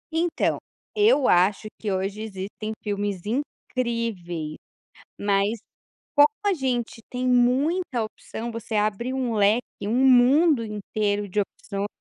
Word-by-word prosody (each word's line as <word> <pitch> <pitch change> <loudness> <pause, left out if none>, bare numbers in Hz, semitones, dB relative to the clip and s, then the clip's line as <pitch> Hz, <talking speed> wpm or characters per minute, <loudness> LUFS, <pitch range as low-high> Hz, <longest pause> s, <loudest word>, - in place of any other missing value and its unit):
Então, 335 0 +1 0.4
eu 420 - +4
acho 190 +4 +3
que 210 - -2
hoje 195 +2 -2
existem 210 +1 -5
filmes 205 -3 -2
incríveis, 230 - -3 0.6
mas, 200 +2 +1 0.6
como 290 0 +9 0.2
a 405 - +4
gente 250 -8 -2
tem 250 0 -4
muita 255 +3 +2
opção, 220 +1 -6
você 230 0 -6
abre 215 +4 0
um 250 -4 -1
leque, 210 +4 +4 0.2
um 215 - 0
mundo 265 +2 +5
inteiro 205 -1 -2
de 195 - -3
opçõ 200 0 -4
225 Hz, 120 wpm, -25 LUFS, 205-255 Hz, 0.6 s, como